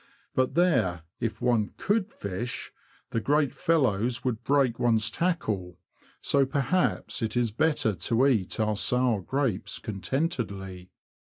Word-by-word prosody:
But 130 0 +1
there, 125 - +2 0.2
if 115 +1 -3
one 120 -4 +1
could 210 0 0
fish, 100 +5 -5 0.4
the 115 - 0
great 145 +2 +2
fellows 120 -7 +1
would 120 -2 -1
break 135 -3 +2
one's 115 -2 +2
tackle; 105 - -1 0.4
so 140 -1 +3
perhaps 140 +6 0
it 110 +1 -1
is 120 -3 +1
better 150 -3 +1
to 115 +6 +1
eat 115 -10 +1
our 110 -1 +1
sour 125 -1 +2
grapes 130 -2 -1
contentedly. 100 - -3
120 Hz, 130 wpm, -27 LUFS, 105-140 Hz, 0.4 s, so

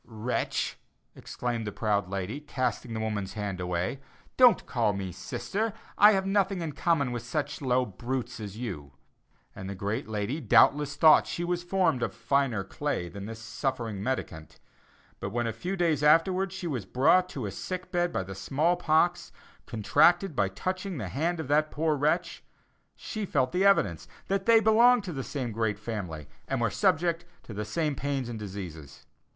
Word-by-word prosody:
"Wretch!" 115 +2 -2 0.4
exclaimed 120 -3 -4
the - - -2
proud 100 -3 0
lady, 100 +7 -3
casting 125 -5 -3
the - - -2
woman's 105 -3 -3
hand 100 -3 -4
away; 90 +7 -2 0.4
"Don't 250 -3 +6
call 115 -5 +1
me 95 -2 -4
sister, 215 - -3 0.2
I 210 +1 +7
have 190 -1 +1
nothing 195 -1 +1
in 160 - -3
common 145 -3 +1
with 120 -1 -3
such 145 +6 -3
low 130 -1 +2
brutes 120 +4 -4
as 105 -1 -7
you." 90 - -6 0.6
And 95 - -7
the 100 - -5
great 105 +7 -3
lady 110 +7 -2
doubtless 145 -1 +4
thought 155 -1 +6
she 170 - -3
was 175 0 -1
formed 175 -7 +1
of - - -2
finer 135 -8 +1
clay 95 -3 -3
than 100 +2 -8
this 115 0 -7
suffering 115 -2 -3
mendicant; 100 -10 -4 0.6
but 95 - -4
when 120 +3 -1
a 115 - -2
few 180 - -4
days 165 -5 +1
afterwards 180 +5 +3
she 185 - -6
was 125 - -3
brought 170 - +3
to 135 -9 -5
a 100 - -3
sick 185 - -6
bed 175 -1 +1
by 95 - -1
the 95 +1 -8
small 145 - 0
pox, 175 +1 +1 0.4
contracted 170 - +3
by 100 -5 +2
touching 185 - -4
the - - -4
hand 165 +5 -1
of 160 - -4
that 150 +2 +2
poor 155 0 0
wretch, 160 +5 0 0.5
she 215 -2 -5
felt 130 -9 0
the 180 +2 +1
evidence 100 - +3 0.2
that 195 +1 -1
they 230 -1 +7
belonged 230 +2 +5
to 180 -4 -5
the 135 -2 -4
same 130 -5 -4
great 110 -1 -1
family, 100 -9 -5 0.2
and - - -1
were - - +1
subject 170 +1 +1 0.2
to 110 - -9
the 105 +1 -3
same 150 +8 -1
pains 135 -2 -2
and 115 -2 -5
diseases. 85 -8 -8
130 Hz, 180 wpm, -28 LUFS, 105-170 Hz, 0.6 s, I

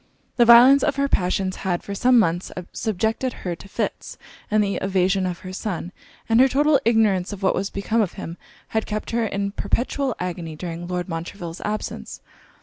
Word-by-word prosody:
The 240 - +6
violence 245 +4 +8
of 295 -2 +1
her 280 0 +1
passions 185 -4 0
had, 180 -3 -2
for 200 - -6
some 245 +5 +4
months, 175 -4 +1 0.2
subjected 220 +4 -1
her 175 -1 -1
to 195 - -14
fits; - - -4 0.3
and 215 0 +3
the 200 -1 -1
evasion 190 0 +1
of 175 -1 -5
her 185 0 -8
son, 185 -3 -4 0.4
and 225 +1 +4
her 265 - +7
total 285 +2 +3
ignorance 215 -5 +2
of 200 -1 -7
what 190 - +3
was 195 +2 -2
become 220 +3 0
of 200 - -1
him, 165 - -7 0.3
had 220 0 -1
kept 215 0 -4
her 230 -1 +1
in 200 0 -2
perpetual 250 +5 -1
agony 175 -3 -4
during 170 +1 -6
Lord 180 0 -3
Montreville's 170 0 -6
absence. 215 0 -4
200 Hz, 185 wpm, -23 LUFS, 180-230 Hz, 0.4 s, violence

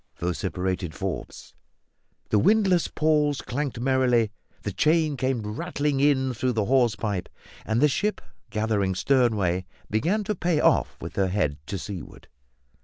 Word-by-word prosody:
vociferated 90 0 -2
Forbes. - - -5 0.8
The 105 - +3
windlass 190 - +3
pawls 150 -2 +1
clanked 130 -1 -3
merrily, 125 -4 +2 0.3
the 105 - -2
chain 155 - +2
came 130 -3 -1
rattling 135 +7 -2
in 135 -2 +3
through 125 +2 -1
the 110 -3 0
hawse 120 -2 +3
pipe, 100 -3 -3 0.4
and 110 +2 +1
the 150 - +6
ship, 210 +9 0 0.3
gathering 105 -3 0
stern 125 +1 +3
way, 90 -2 0 0.2
began 170 - +1
to 210 - -1
pay 175 -4 0
off - - +2
with - - -7
her 95 -1 +3
head 90 -7 -1
to 100 - -3
seaward. 95 -4 -8
125 Hz, 145 wpm, -25 LUFS, 100-145 Hz, 0.8 s, the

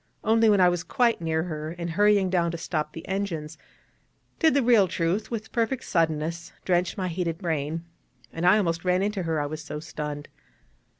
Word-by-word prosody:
Only 225 0 +4
when 205 -2 +4
I 180 - +6
was 175 -1 0
quite 235 0 +1
near 160 -1 0
her, 155 -1 -5
and 170 -1 -4
hurrying 205 0 +3
down 170 -2 +2
to 170 - -4
stop 155 -2 -3
the 165 - -9
engines, 170 -6 -3 0.8
did 320 -4 +4
the 280 - +3
real 230 -5 +5
truth, 180 +6 -1
with 220 -2 -5
perfect 235 +2 -1
suddenness, 165 0 -1
drench 180 -1 +1
my 185 -2 -1
heated 170 -1 -2
brain; 165 -2 -2 0.5
and 165 - -4
I 180 +4 +6
almost 170 -4 0
ran 180 +1 +2
into 205 -1 -1
her, 165 -3 -1
I 145 - -1
was 155 +1 -5
so 150 - -6
stunned. 150 -1 -6
175 Hz, 190 wpm, -26 LUFS, 160-200 Hz, 0.8 s, I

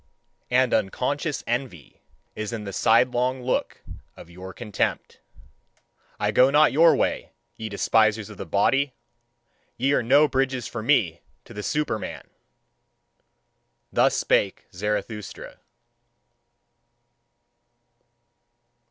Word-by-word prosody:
And 125 0 +2
unconscious 140 - -1
envy 120 - -5 0.3
is 110 0 -4
in 115 -2 -5
the 100 -1 -7
sidelong 125 +4 +2
look 125 - -2 0.3
of 85 - -13
your 90 +2 -9
contempt. 105 -1 -3 1.0
I - - 0
go 130 +1 +5
not 150 +2 +4
your 165 +4 +5
way, - - -2 0.2
ye 110 -1 -6
despisers 110 +1 +2
of 105 - -12
the - - -6
body! 135 +7 +1 0.8
Ye 135 +3 +1
are - - +2
no 140 +6 +4
bridges 130 -3 -1
for 120 - -6
me 100 - +1 0.2
to 120 - -13
the 105 - -6
Superman! 150 -3 -3 1.7
Thus - - +3
spake 100 -2 0
Zarathustra. 105 +2 -5
120 Hz, 105 wpm, -24 LUFS, 105-135 Hz, 1.7 s, go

